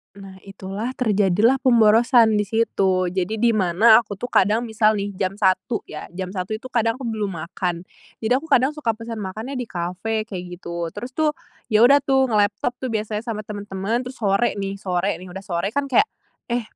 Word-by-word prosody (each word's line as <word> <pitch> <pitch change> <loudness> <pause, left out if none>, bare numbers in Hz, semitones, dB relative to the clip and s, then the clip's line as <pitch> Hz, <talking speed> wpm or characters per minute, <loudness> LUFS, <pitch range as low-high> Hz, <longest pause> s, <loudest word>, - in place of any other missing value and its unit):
Nah, 195 -1 -12
itulah, 195 +5 -5
terjadilah 210 +1 +2
pemborosan 230 -2 +5
di 210 - 0
situ. 190 -4 +1
Jadi, 185 +3 -2
di 235 +2 +2
mana, 215 +2 +5
aku 210 -3 -4
tuh 245 +6 -6
kadang, 210 +5 +3
misal 220 -2 +2
nih, 200 -1 -2
jam 190 0 -1
1.00 200 +3 0
ya, 155 - -7
jam 185 0 -4
1.00 190 +2 -4
itu 250 +4 -8
kadang 230 -2 +1
aku 260 - -10
belum 215 -5 -3
makan. 170 +1 -4 0.4
Jadi 220 - -1
aku 320 - -11
kadang 265 -2 +3
suka 295 -7 -2
pesan 230 0 -7
makannya 220 +7 -5
di 245 - -4
kafe, 185 +5 -3
kayak 190 -5 -6 0.2
gitu. 170 -1 -4
Terus 245 +2 -6
tuh, 305 +2 0 0.3
ya 220 -1 +3
udah 280 +4 +7
tuh, 265 -2 +1
ngelaptop 210 +3 0
tuh, 260 - -4
biasanya 215 +1 -3
sama 215 -2 -3
teman-teman, 205 +3 -3
terus 255 - -7
sore 200 +3 +2
nih. 195 0 -4
Sore 185 -1 -1
nih, 185 - -11
udah 195 - -7
sore, 195 +3 -3
kan 280 -1 -1
kayak, 410 +9 +4 0.4
"Eh, 240 0 -1
215 Hz, 195 wpm, -22 LUFS, 195-235 Hz, 0.4 s, udah